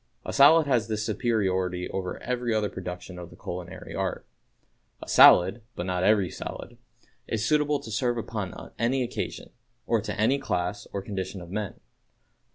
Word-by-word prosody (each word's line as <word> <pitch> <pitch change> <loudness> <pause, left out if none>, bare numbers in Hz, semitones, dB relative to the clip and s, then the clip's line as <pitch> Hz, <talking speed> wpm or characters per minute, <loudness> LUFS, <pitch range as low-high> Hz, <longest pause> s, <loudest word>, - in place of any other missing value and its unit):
A - - -4
salad 150 +3 +7
has 125 -5 +1
this 110 -1 -2
superiority 95 -5 0
over 95 -1 -3
every 120 -2 -1
other 105 -1 +1
production 90 -1 -7
of 85 -1 -8
the - - -14
culinary 90 -1 -7
art: - - -3 0.8
A - - -10
salad 90 +7 +7
(but 90 - -4
not 90 -1 -1
every 100 -4 +3
salad) - - -7 0.5
is 115 0 -1
suitable 150 +1 +2
to 115 -5 -9
serve 120 +3 0
upon 105 -5 -5
any 125 +3 +1
occasion, 120 - -5 0.3
or 115 -2 +1
to 105 - -5
any 130 +6 +3
class 100 -4 -2
or 100 - -4
condition 95 -1 -4
of 85 0 -10
men. 105 0 -3
105 Hz, 165 wpm, -27 LUFS, 90-120 Hz, 0.8 s, salad